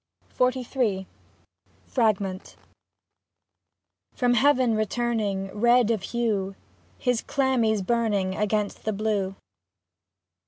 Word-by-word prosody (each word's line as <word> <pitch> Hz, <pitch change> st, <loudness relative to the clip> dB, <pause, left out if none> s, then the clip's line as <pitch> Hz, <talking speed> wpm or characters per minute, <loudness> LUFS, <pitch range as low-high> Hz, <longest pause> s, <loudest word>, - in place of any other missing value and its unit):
48 255 Hz, 0 st, +1 dB
XLIII 210 Hz, -8 st, -1 dB, 0.8 s
FRAGMENT 200 Hz, -6 st, -1 dB, 1.6 s
From 245 Hz, -1 st, +2 dB
heaven 255 Hz, -1 st, +3 dB
returning; 215 Hz, -3 st, -1 dB
Red 235 Hz, +1 st, +4 dB
of 220 Hz, -4 st, 0 dB
hue, 205 Hz, -4 st, -1 dB, 0.4 s
his 245 Hz, -2 st, 0 dB
chlamys 235 Hz, -7 st, +1 dB
burning 210 Hz, -4 st, +1 dB
Against 210 Hz, 0 st, -1 dB
the 215 Hz, -, 0 dB
blue. 200 Hz, -2 st, -1 dB
220 Hz, 85 wpm, -25 LUFS, 200-245 Hz, 1.6 s, Red